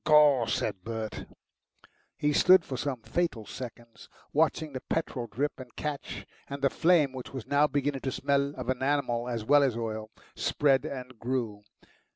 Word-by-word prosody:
"Gaw!" 150 Hz, -6 st, +6 dB
said 105 Hz, -3 st, -1 dB
Bert. 110 Hz, 0 st, -4 dB, 0.9 s
He 150 Hz, 0 st, +1 dB
stood 180 Hz, +2 st, +6 dB
for 135 Hz, -, -4 dB
some 130 Hz, -3 st, -3 dB
fatal 165 Hz, -11 st, -1 dB
seconds 120 Hz, +1 st, -9 dB, 0.2 s
watching 155 Hz, 0 st, +1 dB
the 130 Hz, -, -4 dB
petrol 130 Hz, -7 st, -1 dB
drip 140 Hz, +7 st, -2 dB
and 125 Hz, -2 st, -11 dB
catch, 150 Hz, -2 st, -4 dB, 0.2 s
and 140 Hz, 0 st, -5 dB
the 140 Hz, -, +4 dB
flame, 160 Hz, -6 st, +3 dB
which 130 Hz, -1 st, -7 dB
was 130 Hz, -, -5 dB
now 145 Hz, +1 st, +4 dB
beginning 145 Hz, -1 st, -1 dB
to 130 Hz, -, -2 dB
smell 140 Hz, +1 st, 0 dB
of 125 Hz, -, -1 dB
enamel 130 Hz, -2 st, 0 dB
as 115 Hz, -3 st, -3 dB
well 145 Hz, +4 st, +6 dB
as 130 Hz, -5 st, +2 dB
oil, 110 Hz, -2 st, -4 dB, 0.3 s
spread 135 Hz, -2 st, +2 dB
and 130 Hz, -3 st, -7 dB
grew. 115 Hz, -4 st, -2 dB
130 Hz, 165 wpm, -29 LUFS, 120-145 Hz, 0.9 s, Gaw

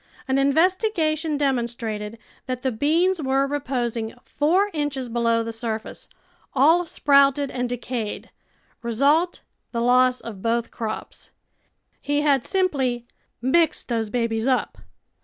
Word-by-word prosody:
An 265 Hz, +1 st, +2 dB
investigation 320 Hz, 0 st, +1 dB
demonstrated 235 Hz, -5 st, -2 dB, 0.3 s
that 255 Hz, -1 st, -4 dB
the 260 Hz, -, +1 dB
beans 325 Hz, +9 st, +2 dB
were 270 Hz, 0 st, +2 dB
reposing 245 Hz, -5 st, -2 dB
four 365 Hz, +8 st, +1 dB
inches 285 Hz, -5 st, -2 dB
below 230 Hz, -1 st, +1 dB
the 230 Hz, 0 st, -5 dB
surface, 225 Hz, -1 st, -5 dB, 0.5 s
all 325 Hz, +6 st, +4 dB
sprouted 280 Hz, -2 st, +3 dB
and 250 Hz, -1 st, -2 dB
decayed 240 Hz, -3 st, -4 dB, 0.3 s
— -, -, -38 dB
result, 280 Hz, +9 st, +2 dB, 0.3 s
the 235 Hz, -, -2 dB
loss 250 Hz, +1 st, +4 dB
of 210 Hz, -5 st, -9 dB
both 230 Hz, +1 st, 0 dB
crops. 220 Hz, -2 st, -6 dB, 0.7 s
He 290 Hz, +1 st, 0 dB
had 280 Hz, -4 st, +3 dB
simply 270 Hz, -11 st, 0 dB, 0.2 s
" -, -, -47 dB
mixed 320 Hz, +4 st, +2 dB
those 225 Hz, -2 st, -1 dB
babies 230 Hz, 0 st, -1 dB
up." 255 Hz, -2 st, 0 dB
260 Hz, 125 wpm, -23 LUFS, 235-295 Hz, 0.7 s, all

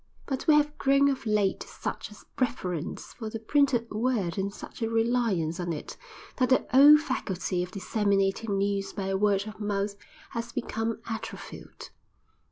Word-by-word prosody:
But 265 Hz, -2 st, -4 dB
we 310 Hz, -, +7 dB
have 295 Hz, 0 st, +2 dB
grown 275 Hz, +1 st, +4 dB
of 265 Hz, -4 st, -3 dB
late 210 Hz, -2 st, +2 dB
to -, -, -8 dB
such -, -, -5 dB
a -, -, -11 dB, 0.2 s
reverence 185 Hz, -, -2 dB
for 220 Hz, -3 st, -6 dB
the 225 Hz, -, -4 dB
printed 240 Hz, 0 st, +1 dB
word 215 Hz, -6 st, 0 dB
and 200 Hz, 0 st, -2 dB
such 205 Hz, -, -11 dB
a 225 Hz, -, 0 dB
reliance 225 Hz, -8 st, +1 dB
on 175 Hz, -1 st, -2 dB
it, 150 Hz, -, -6 dB, 0.4 s
that 255 Hz, -1 st, +2 dB
the 260 Hz, -, +3 dB
old 295 Hz, +3 st, +9 dB
faculty 190 Hz, -, -2 dB
of 180 Hz, -, -3 dB
disseminating 200 Hz, +1 st, 0 dB
news 200 Hz, 0 st, -1 dB
by 195 Hz, -1 st, -2 dB
word 200 Hz, 0 st, +2 dB
of 215 Hz, 0 st, -9 dB
mouth 205 Hz, -1 st, -1 dB, 0.4 s
has 230 Hz, 0 st, -5 dB
become 230 Hz, -3 st, -2 dB
atrophied. 225 Hz, -1 st, -7 dB
215 Hz, 165 wpm, -28 LUFS, 195-250 Hz, 0.4 s, old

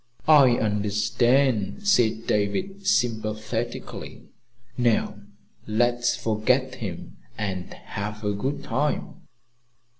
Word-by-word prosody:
"I 140 Hz, -6 st, +7 dB
understand," 105 Hz, -, +1 dB
said 115 Hz, -, +3 dB
David 190 Hz, -, -1 dB
sympathetically. 115 Hz, -, -2 dB, 0.5 s
"Now 120 Hz, -3 st, +1 dB, 0.5 s
let's 120 Hz, +2 st, +1 dB
forget 125 Hz, +4 st, +1 dB
him 105 Hz, -9 st, -7 dB, 0.2 s
and 95 Hz, -4 st, -4 dB
have 105 Hz, +2 st, -6 dB
a 105 Hz, 0 st, 0 dB
good 130 Hz, +8 st, -3 dB
time." -, -, -2 dB
115 Hz, 85 wpm, -25 LUFS, 105-125 Hz, 0.5 s, I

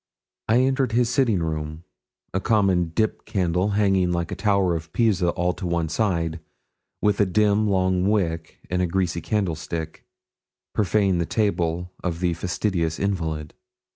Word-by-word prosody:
I 115 Hz, +3 st, +4 dB
entered 130 Hz, -2 st, +1 dB
his 120 Hz, 0 st, +3 dB
sitting 120 Hz, -, +2 dB
room; 80 Hz, 0 st, -4 dB, 0.5 s
a 95 Hz, -, +1 dB
common 95 Hz, -5 st, +2 dB
'dip' 110 Hz, +6 st, -1 dB
candle 90 Hz, 0 st, 0 dB
hanging 95 Hz, -3 st, +3 dB
like 85 Hz, -1 st, -1 dB
the -, -, -4 dB
tower 100 Hz, -5 st, +2 dB
of 80 Hz, 0 st, -6 dB
Pisa 100 Hz, -7 st, +2 dB
all 90 Hz, +1 st, 0 dB
to 90 Hz, -, -5 dB
one 85 Hz, -2 st, 0 dB
side, 85 Hz, -4 st, 0 dB, 0.6 s
with 105 Hz, -1 st, +2 dB
a -, -, +5 dB
dim, 105 Hz, +2 st, +2 dB
long 95 Hz, -1 st, +2 dB
wick, 85 Hz, -6 st, -1 dB
in 90 Hz, 0 st, -1 dB
a 90 Hz, -, +2 dB
greasy 85 Hz, -1 st, -1 dB
candlestick, 80 Hz, -5 st, -3 dB, 0.7 s
profaned 100 Hz, -3 st, +2 dB
the 85 Hz, -, -2 dB
table 90 Hz, -4 st, -1 dB
of 85 Hz, -2 st, -2 dB
the 90 Hz, -1 st, +1 dB
fastidious 85 Hz, -1 st, -1 dB
invalid. 80 Hz, -6 st, -2 dB
90 Hz, 150 wpm, -24 LUFS, 85-105 Hz, 0.7 s, a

